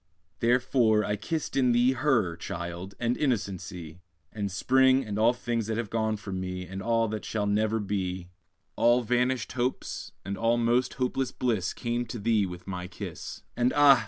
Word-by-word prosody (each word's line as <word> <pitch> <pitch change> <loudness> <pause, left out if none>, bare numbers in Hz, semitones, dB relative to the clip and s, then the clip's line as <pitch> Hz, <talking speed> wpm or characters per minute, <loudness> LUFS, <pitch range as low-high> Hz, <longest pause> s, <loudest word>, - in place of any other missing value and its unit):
Therefore 120 -3 +3
I 105 - 0
kissed 155 - -3
in 125 -3 +4
thee 120 +2 +4
Her, 120 - +1
child! 90 +1 -6
and 120 +1 +1
innocency, 95 - -3 0.3
And 100 -3 -3
spring, 130 +5 +4
and 105 -1 -3
all 115 +2 +5
things 120 -3 -2
that 110 0 -1
have 115 -3 -3
gone 110 -1 0
from 95 -3 -5
me, 90 0 -4
And 95 +2 -6 0.3
that 110 -1 -4
shall 105 -2 -2
never 110 +2 +1
be; 95 -3 -3 0.4
All 120 +1 +4
vanished 125 +1 +1
hopes, 125 0 -3
and 100 0 -4
all 115 +1 +3
most 120 +2 +2
hopeless 130 0 -1
bliss, 110 -7 0
Came 120 0 -2
with 115 -4 -6
thee 110 -3 +3
to 90 -1 -7
my 90 -2 -5
kiss. 90 - -7
And 125 +1 +2
ah! 145 -3 +7
110 Hz, 170 wpm, -28 LUFS, 95-125 Hz, 0.4 s, ah